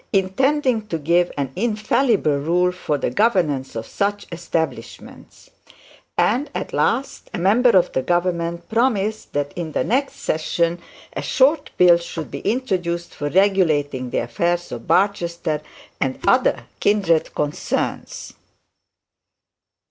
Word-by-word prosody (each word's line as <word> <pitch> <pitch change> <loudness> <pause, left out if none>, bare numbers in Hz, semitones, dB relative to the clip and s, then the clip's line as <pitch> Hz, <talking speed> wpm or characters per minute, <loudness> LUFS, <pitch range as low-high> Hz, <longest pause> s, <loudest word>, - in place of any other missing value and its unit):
intending 255 +6 +2
to 170 - -2
give 170 +3 +2
an 135 -2 -2
infallible 215 - +1
rule 175 +5 +2
for 170 -5 -2
the 130 - -2
governance 155 - +1
of 115 - -4
such 205 0 -2
establishments; 160 -8 -5 0.7
and, 255 +7 +2
at - - -4
last, 275 - -1
a - - -2
member 215 +8 +4
of 180 - +2
the 130 - 0
government 170 +1 -1
promised 220 -2 0
that 145 0 -2
in 165 -3 -5
the - - +1
next 270 +4 0
session 170 +2 -1 0.3
a - - -3
short 285 +3 +2
bill 175 -1 +7
should 165 -2 -7
be - - -5
introduced 185 -7 -2
for 145 0 -3
regulating 155 -9 +2
the - - -2
affairs 170 +9 -1
of - - -7
Barchester, 170 -5 +1 0.4
and 130 -1 -1
other - - +3
kindred 190 -6 +2
concerns. 150 0 -3
175 Hz, 125 wpm, -21 LUFS, 155-210 Hz, 0.7 s, bill